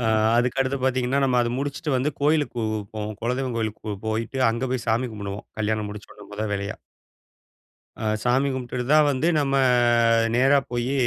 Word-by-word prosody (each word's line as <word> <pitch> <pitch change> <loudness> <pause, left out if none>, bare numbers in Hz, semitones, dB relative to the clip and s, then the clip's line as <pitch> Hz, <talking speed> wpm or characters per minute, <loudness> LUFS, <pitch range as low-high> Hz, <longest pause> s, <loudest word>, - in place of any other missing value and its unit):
அ - - -3 0.4
அதுக்கு 125 +2 0
அடுத்து 135 +1 0
பாத்தீங்கன்னா, 130 +1 +1
நம்ம 125 -2 +2
அத 120 - +1
முடிச்சுட்டு 145 +3 -3
வந்து 135 +4 0
கோயிலுக்கு 150 -2 +1
போவு 110 -1 -1 0.2
போவோம். 105 -1 -4
குலதெய்வம் 125 0 -1
கோயிலுக்கு 110 -1 -3
போ 105 - -2
போயிட்டு 115 +4 -2
அங்க 115 +3 -2
போய் 125 -2 -2
சாமி 120 +3 +1
கும்புடுவோம், 100 -1 -6
கல்யாணம் 105 0 -1
முடிச்சோட்ன 105 0 -11
முத 105 +1 -3
வேலையா. 100 0 -3 1.2
அ - - -7 0.2
சாமி 130 +3 +2
கும்ப்ட்டுடுதான் 130 +4 +2
வந்து 135 +5 0
நம்ம 140 -2 0 0.8
நேரா 135 +3 +5
போயி 120 +2 -1
125 Hz, 165 wpm, -24 LUFS, 110-135 Hz, 1.2 s, நேரா